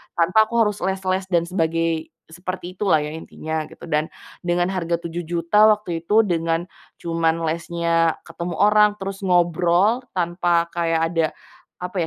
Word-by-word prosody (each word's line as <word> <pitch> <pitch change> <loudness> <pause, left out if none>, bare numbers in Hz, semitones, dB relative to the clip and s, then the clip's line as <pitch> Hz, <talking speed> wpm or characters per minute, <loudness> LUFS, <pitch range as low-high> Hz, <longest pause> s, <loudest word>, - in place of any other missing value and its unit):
tanpa 185 +6 +4
aku 235 - -6
harus 210 -1 -1
les-les 190 0 -1
dan 175 -3 +2
sebagai 165 -2 -1 0.2
seperti 180 +1 -6
itulah 185 -7 +3
ya 150 - -5
intinya 160 0 -5
gitu, - - -16
dan 150 +1 +1 0.3
dengan 175 +1 0
harga 175 -2 -1
7 170 0 -6
juta 175 +5 +4
waktu 210 -6 +1
itu 210 +7 +3
dengan 165 -3 0 0.3
cuman 165 -1 -1
lesnya 165 0 0
ketemu 170 +1 -6
orang 210 +1 +4
terus 195 -1 -6
ngobrol 180 +3 +2 0.2
tanpa 175 -1 +1
kayak 165 -1 0
ada 165 -2 +2 0.6
apa 180 +1 -5
175 Hz, 145 wpm, -22 LUFS, 165-190 Hz, 0.6 s, tanpa